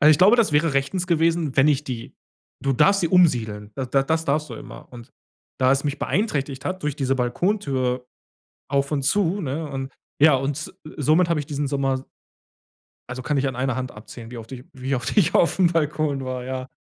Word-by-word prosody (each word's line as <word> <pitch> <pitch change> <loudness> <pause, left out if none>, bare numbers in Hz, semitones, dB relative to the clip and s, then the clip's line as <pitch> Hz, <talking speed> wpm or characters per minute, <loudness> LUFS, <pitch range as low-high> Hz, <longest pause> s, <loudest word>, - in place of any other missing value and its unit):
Also, 150 - +7
ich 150 - +5
glaube, 200 +6 +6
das 230 -9 +2
wäre 150 0 +2
rechtens 175 +7 0
gewesen, 165 -3 +1
wenn 135 +2 +5
ich 150 0 +1
die 120 -4 -6 0.5
du 135 - 0
darfst 195 +10 +4
sie 170 - +1
umsiedeln. 115 - +2
D 130 - -2
da 135 - +3
das 160 +2 0
darfst 150 +1 0
du 120 - -7
immer. - - -11
Und 120 -1 -11 0.5
da 130 0 +4
es 135 0 +1
mich 145 0 -2
beeinträchtigt 145 - -1
hat 185 0 -3
durch 150 - -1
diese 135 -2 0
Balkontür 130 - -1 0.6
auf 140 0 +1
und 140 - 0
zu, 195 +6 +1
ne, 150 +1 -3
und 135 -1 -5 0.3
ja 155 -2 +7
und, 135 +1 -3
äh, 155 - -9
somit 155 +4 +3
habe 165 -3 +1
ich 145 - -7
diesen 145 0 -2
Sommer 135 -1 -1 1.0
Also, 130 +1 -5
kann 145 +3 -1
ich 140 0 +1
an 130 - -5
einer 130 -1 -1
Hand 130 -1 -3
abzählen, 115 +2 -11
wie 125 - -8
oft 115 +2 -10
ich 125 -1 -8
wie 130 +1 -3
oft 130 - -3
ich 195 -7 +4
auf 170 - +3
'm 185 - +5
Balkon 150 -3 0
war, 130 -1 -4
ja. 130 0 -4
140 Hz, 215 wpm, -23 LUFS, 130-160 Hz, 1.0 s, Also